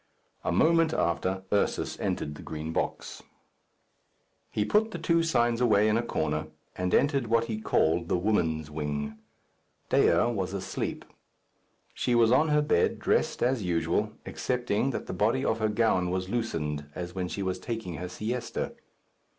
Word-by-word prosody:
A - - 0
moment 165 - +4
after, 95 +3 0
Ursus 100 - 0
entered 75 - -2
the 75 - -10
Green 80 +1 -5
Box. - - -3 1.3
He 105 - 0
put 215 - +3
the 180 - -5
two 165 +1 +2
signs 120 -7 +2
away 105 -3 +4
in 110 - +3
a 115 - +2
corner, 80 -9 -2 0.3
and 90 0 -1
entered 140 -4 +2
what 115 0 +3
he 110 -2 -4
called 85 -3 +2
the - - +2
woman's 80 -6 0
wing. 75 -1 -3 0.7
Dea 85 - +4
was 95 -3 -2
asleep. 95 - -4 0.9
She 120 - 0
was 115 -1 +5
on 150 +5 +4
her 150 -1 +3
bed, 145 - +2
dressed - - +1
as 125 -1 +2
usual, 90 +4 0
excepting 125 -1 -1
that 135 - -3
the - - -5
body 115 +8 +1
of 110 - +1
her 110 -1 +1
gown 105 -5 +2
was 95 +1 -2
loosened, 75 -11 -2
as 90 0 -5
when 90 -1 -2
she 100 +2 -4
was 95 -1 -2
taking 110 -8 -5
her 90 +1 -5
siesta. 115 +6 -3
105 Hz, 160 wpm, -28 LUFS, 85-120 Hz, 1.3 s, was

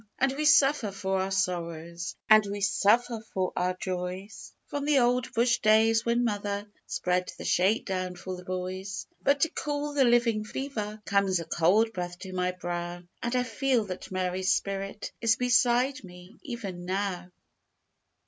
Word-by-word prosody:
And 270 0 +2
we 305 +2 -1
suffer 280 -6 +5
for 190 -1 -2
our 190 - -1
sorrows, 170 -2 -2
And 215 0 +7
we 200 +1 -4
suffer 225 +4 +2 0.2
for 185 -1 0
our 180 0 0
joys, 185 +2 -5
From 285 -1 -4
the 295 -1 +3
old 245 -1 +2
bush 240 +1 +2
days 225 +1 +4
when 235 +1 +1
mother 205 -2 -2 0.2
Spread 180 0 -1
the - - -8
shake 195 +6 +2
down 185 -2 -3
for 185 +1 -6
the 180 - -10
boys. 185 +2 -4 0.2
But 280 0 +2
to 325 - +4
cool 295 -1 -3
the 285 -2 +4
living 235 -3 +3
fever, 215 -3 -5
Comes 200 -3 +2
a 165 - -5
cold 195 +8 +2
breath 175 -2 -4
to 190 -1 -7
my 180 0 0
brow, 175 -1 -5 0.2
And 235 +1 -1
I 250 - +2
feel 250 -1 0
that 185 -1 -7
Mary's 185 0 0
spirit 195 +1 -2
Is 230 -1 +4
beside 250 +2 +2
me, 180 +2 -13
even 215 - -6
now. 185 -1 -2
200 Hz, 165 wpm, -28 LUFS, 185-240 Hz, 0.2 s, And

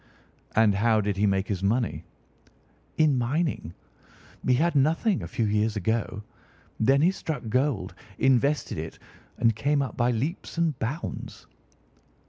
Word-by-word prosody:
"And 110 -2 +5
how 110 +2 +3
did 105 -1 -1
he 105 +1 +3
make 95 0 +1
his 95 -3 -2
money?" 110 +4 0 0.9
"In 150 -5 +3
mining. 130 - -1 0.7
He 125 - +3
had 170 +6 +2
nothing 165 - +2
a - - -5
few 115 - -1
years 105 +1 +1
ago. 105 +1 -1 0.6
Then 135 +6 +4
he 180 - +5
struck 150 -11 -5
gold, 120 -7 0 0.2
invested 135 - +2
it, 80 +1 -6 0.4
and 115 -2 +3
came 140 +5 +1
up 130 - -6
by 120 0 +2
leaps 140 +10 -3
and 165 -5 0
bounds." 135 +10 -5
120 Hz, 140 wpm, -26 LUFS, 105-145 Hz, 0.9 s, And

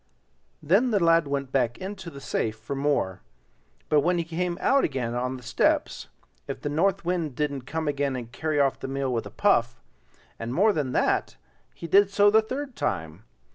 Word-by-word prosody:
Then 195 - +3
the 210 -4 +2
lad 165 -2 +4
went 140 -2 -3
back 125 -4 +1
into 190 -2 -7
the 140 - -10
safe 110 -5 -2
for 120 +5 -6
more; 135 -10 0 0.7
but 150 - +4
when 175 +5 +1
he 170 - 0
came 175 +1 -3
out 275 0 +3
again 130 -5 -1
on 125 +2 -2
the 125 - -13
steps, 120 - 0 0.4
if - - -5
the 145 - -3
North 180 +5 +1
Wind 170 -6 -1
didn't 140 -3 -2
come 160 +1 -3
again 140 -2 0
and 120 -2 -6
carry 155 +3 -1
off 140 -2 +2
the - - -5
meal 135 -1 -2
with 115 - -2
a - - -9
puff; 120 - +1 0.6
and 115 +2 -4
more 210 +4 +4
than 140 -6 -2
that, - - 0 0.4
he - - -8
did 195 +4 +5
so 205 +1 +4
the 220 +1 +6
third 260 +4 -5
time. 85 - -3
145 Hz, 195 wpm, -26 LUFS, 130-180 Hz, 0.7 s, the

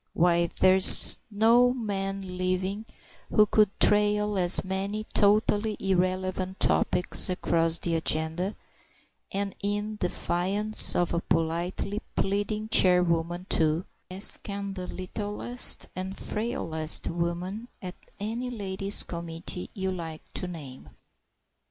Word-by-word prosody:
Why, 170 0 +1
there's 185 +2 +8
no 235 +4 +2
man 195 -4 -6
living 185 +4 -4 0.4
who 210 - +3
could 210 0 +1
trail 210 0 +1
as 180 -2 +5
many 195 +3 -5
totally 210 0 0
irrelevant 185 0 -3
topics 180 +1 +2
across 165 -2 0
the 170 - -4
agenda, 160 +4 -2 0.8
and 200 0 -4
in 205 +1 -4
defiance 195 +3 +4
of 175 -1 -1
a 170 - -1
politely 175 +6 -4
pleading 205 +2 -3
chairwoman 175 -2 +1
too, 160 +2 0 0.2
as 190 +3 +1
can 200 -1 -8
the 185 -2 -8
littlest 205 +6 -1
and 185 +1 -7
frailest 165 -9 0
woman 175 +6 -5
at 180 -2 -9 0.3
any 230 +5 -5
ladies' 195 -3 +1
committee 170 +1 -7
you 190 -2 -4
like 165 -3 -9
to 180 - -4
name. 145 -7 -11
190 Hz, 110 wpm, -25 LUFS, 175-205 Hz, 0.8 s, there's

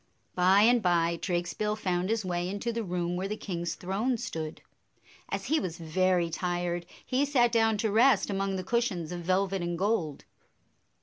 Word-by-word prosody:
By 185 +3 +5
and 240 +1 +5
by, 170 -2 +2
Drakesbill 180 +4 -1
found 185 -3 -1
his 225 -2 0
way 175 0 -1
into 205 +4 -3
the 230 0 -2
room 175 -2 -2
where 185 +2 -2
the 210 +2 -4
king's 175 -5 -4
throne 210 +7 -1
stood. 165 -10 -5 0.7
As - - -3
he 315 +1 +2
was 170 -2 -4
very 175 +1 +1
tired, 175 0 -2 0.2
he 260 +2 +1
sat 250 -5 +3
dbwn 225 -1 +3
to 220 0 0
rest 230 +1 +4
among 195 -1 -1
the 185 - -3
cushions 190 -6 -1
of 175 - -4
velvet 190 +2 0
and 175 0 -2
gold. 185 -7 -1
185 Hz, 175 wpm, -29 LUFS, 175-220 Hz, 0.7 s, By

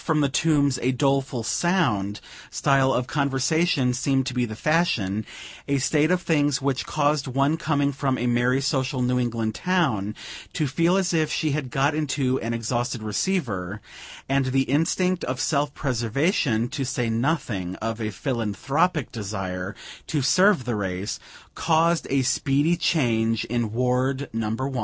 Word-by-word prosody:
from 160 -2 +1
the 140 - +2
tombs 140 -1 +2
a 130 - +2
doleful 135 -2 0
sound" 115 - 0 0.3
style 135 -1 +2
of 125 -1 0
conversation 140 0 +1
seemed 135 +1 +1
to 125 - -3
be 125 -1 +1
the 110 -2 -7
fashion: 115 - +1 0.4
a 140 - +1
state 150 +4 +2
of 180 0 +1
things 145 -4 +2
which 135 -1 -1
caused 150 -2 +1
one 135 +4 +1
coming 145 -3 0
from 135 -1 -1
a 125 - -2
merry, 120 +2 +2
social 135 -2 0
New 125 0 +1
England 115 -3 -1
town, 135 - 0 0.4
to 155 - 0
feel 165 +7 +2
as 185 -2 0
if 155 -2 +1
she 155 - 0
had 140 -2 -2
got 135 +4 +1
into 140 -4 0
an 115 - -3
exhausted 120 0 -2
receiver; 105 - -2 0.5
and 135 0 +1
the 135 +1 +2
instinct 175 +6 +1
of 130 0 -3
self 145 0 +1
preservation, 125 - 0
to 135 - -4
say 125 -2 -1
nothing 115 - -1
of 115 +2 -4
a 110 - -1
philanthropic 135 - -1
desire 95 -3 -4 0.3
to 150 -4 -1
serve 185 - +4
the 120 - -1
race, 95 -1 -3 0.3
caused 165 +1 +2
a 135 -1 +2
speedy 140 +6 +2
change 115 -9 +1
in 120 -2 -2
Ward 125 +3 0
No. 115 -1 -1
1. 130 +3 -2
135 Hz, 155 wpm, -24 LUFS, 115-150 Hz, 0.5 s, serve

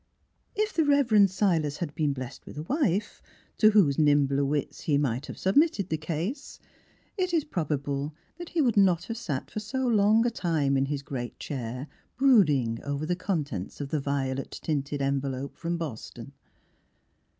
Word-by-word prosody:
57 425 - +2 0.3
The 285 - +6
Transfiguration 235 -7 +4
of 200 - +6
If 185 - -12
the 210 - +3
Rev. 195 - +4
Silas 150 -3 -1
had 165 -4 -4
been 150 -2 0
blessed 130 0 -8
with - - -10
a 150 - -4
wife, 215 - -1 0.4
to 215 - +7
whose 185 -11 +4
nimbler 145 -2 +3
wits 140 0 -2
he 145 -3 +1
might 135 -1 -1
have - - -8
submitted 200 - +2
the 160 - 0
case, 165 - -4 0.6
it 365 -1 +1
is 320 - +2
prob 170 - -3
able 140 +1 -2 0.2
that 345 - -7
he 330 - +1
would 240 -6 +2
not 180 -4 +4
have 230 +4 -5
sat 150 - -4
for - - -3
so 260 +5 -3
long 220 -1 +4
a 240 - +2
time 160 -9 0
in 135 0 +2
his 140 -1 -3
great 125 -4 -5
chair 125 -1 -5 0.3
brooding 150 - +4
over 145 +1 -3
the 180 +2 0
contents 150 - -3
of 140 -1 -4
the 155 - 0
violet 135 -1 -2
tinted 145 -2 -1
envelope 135 0 -2
from 170 0 -3
Boston. 150 -10 -7
155 Hz, 185 wpm, -27 LUFS, 140-205 Hz, 0.6 s, to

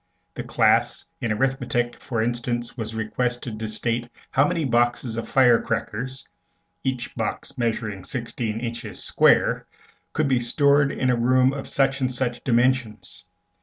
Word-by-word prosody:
The - - -5
class - - +2
in 115 - -1
arithmetic, 120 0 0
for 115 -4 -2
instance, 120 0 -2
was 110 -3 -5
requested 120 +1 -2
to 110 - -3
state 115 +2 -2 0.2
how 140 +2 +4
many 170 -4 -1
boxes 120 -1 +1
of 115 - -4
fire 125 -3 +5
crackers, 120 +3 -4 0.6
each 130 -2 -2
box 115 +3 -4
measuring 110 -5 -2
sixteen 115 -3 -4
inches 115 -2 -6
square, - - +3 0.5
could 155 -1 +1
be 130 -2 +2
stored 140 +3 +3
in 130 -2 +1
a - - +3
room 130 +2 +3
of 140 - -5
such 135 0 +1
and 130 -1 +1
such 125 -1 -2
dimensions. 125 -2 0
120 Hz, 145 wpm, -24 LUFS, 115-130 Hz, 0.6 s, fire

